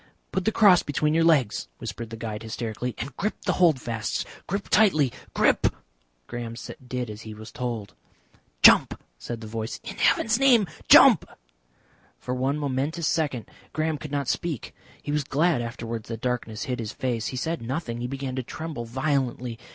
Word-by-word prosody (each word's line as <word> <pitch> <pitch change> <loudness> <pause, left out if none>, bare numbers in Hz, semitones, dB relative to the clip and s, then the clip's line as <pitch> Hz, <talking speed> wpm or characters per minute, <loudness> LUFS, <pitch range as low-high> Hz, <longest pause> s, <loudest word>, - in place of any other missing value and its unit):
"Put 190 -1 -1
the 220 - +3
cross 200 -5 +6
between 150 +1 0
your 165 +1 +3
legs," 140 - +3
whispered 115 -1 -6
the 115 - -7
guide 110 -1 -5
hysterically, 115 +1 -4
"and 130 +2 -6
grip 210 - -1
the - - +2
holdfasts. 125 -9 +1 0.2
Grip 200 +2 -3
tightly, 155 - +4 0.2
grip!" - - +4 0.6
Graham 115 - -6 0.3
did 125 -1 -3
as 105 +1 -9
he 110 -1 -8
was 110 +1 -10
told. 115 -5 -4 0.7
"Jump," - - +7 0.2
said 120 -1 -6
the - - -7
voice. 110 +2 -4
"In 220 -3 -7
heaven's 225 +1 +3
name, 250 -6 +5 0.2
jump!" - - +8 0.9
For 125 - -4
one 130 +3 0
momentous 145 +3 -1
second 145 -8 0 0.3
Graham 155 -1 -1
could 150 - -8
not 140 -2 -1
speak. 160 -3 -2 0.3
He 145 - -3
was 150 0 +1
glad 150 +1 +2
afterwards 115 -1 -5
that 115 -2 -4
darkness 120 -4 -2
hid 130 -4 -3
his 110 -2 -4
face. 120 -4 -2
He 130 - -4
said 165 +5 -2
nothing. 120 -1 -3
He 120 - -2
began 135 0 -4
to - - 0
tremble 150 -1 -6
violently. 125 -2 -1
130 Hz, 170 wpm, -26 LUFS, 115-155 Hz, 0.9 s, jump